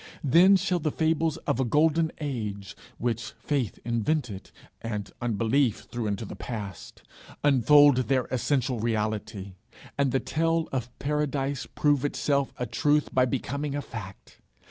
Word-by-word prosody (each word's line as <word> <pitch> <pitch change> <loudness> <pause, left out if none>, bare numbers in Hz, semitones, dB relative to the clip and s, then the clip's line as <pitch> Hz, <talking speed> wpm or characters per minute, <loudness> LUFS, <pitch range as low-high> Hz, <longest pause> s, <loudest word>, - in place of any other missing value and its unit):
Then 170 +8 +6
shall 185 -1 +1
the 155 - 0
fables 160 0 0
of - - 0
a - - +3
golden 160 +5 +2
age, 105 -9 -4 0.2
which 115 -2 -2
faith 135 -8 -2
invented, 115 -2 -1 0.3
and 105 -3 -4
unbelief 115 +2 +1
threw 120 -2 -2
into 105 +2 -2
the - - -8
past, 105 -5 -7 0.4
unfold 145 0 +6
their 130 0 +1
essential 130 -1 0
reality, 110 -3 -2 0.5
and 140 -2 +2
the 135 - +2
tale 165 +2 0
of 125 -3 -2
paradise 140 -2 -1
prove 145 -2 +1
itself 140 -1 0
a 125 - -2
truth 145 +6 +1
by 130 -1 +4
becoming 140 +3 -3
a 145 - -2
fact. 100 -3 -10
130 Hz, 140 wpm, -27 LUFS, 115-150 Hz, 0.5 s, Then